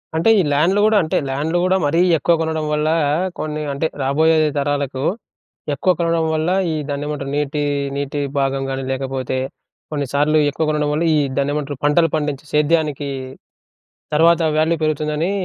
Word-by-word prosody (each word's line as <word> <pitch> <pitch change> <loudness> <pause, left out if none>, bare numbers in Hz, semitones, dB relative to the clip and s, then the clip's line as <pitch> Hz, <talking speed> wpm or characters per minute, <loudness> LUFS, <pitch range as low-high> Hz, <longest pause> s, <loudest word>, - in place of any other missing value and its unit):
అంటే 165 +7 +2
ఈ - - +5
ల్యాండ్‌లు 175 +8 +2
గూడా 215 -1 +4
అంటే, 155 - -1
ల్యాండ్‌లు 150 +6 -1
గూడా 185 +1 +3
మరీ 165 +4 +1 0.2
ఎక్కువ 170 - +2
కొనడం 160 -1 -1
వల్లా, 155 +2 +1 0.4
కొన్ని 155 0 -3
అంటే 160 +3 -1 0.2
రాబోయే 155 +4 +3 0.2
తరాలకు 140 -2 -1 0.7
ఎక్కువ 185 +7 +2
కొనడం 165 -1 +1
వల్ల 160 +2 0 0.2
ఈ - - -1 0.2
దాన్నేమంటారు? 145 -1 -3
నీటి, 150 0 -1 0.3
నీటి 140 +1 -3 0.2
భాగం 135 0 0
గాని 135 0 -3
లేకపోతే 130 -1 -3 0.5
కొన్నిసార్లు 145 +1 +1
ఎక్కువ 160 +3 -2
కొనడం 150 -1 0
వల్ల 155 - 0
ఈ - - +3 0.2
దాన్నేమంటారు? 145 0 -1
పంటలు 165 +3 +3
పండించి 150 -2 -2
సేద్యానికీ 150 -2 +1 1.1
తర్వాత 165 +2 +4 0.2
వాల్యూ 160 +2 +2
పెరుగుతుందని 155 +3 0
150 Hz, 145 wpm, -19 LUFS, 140-160 Hz, 1.1 s, ఈ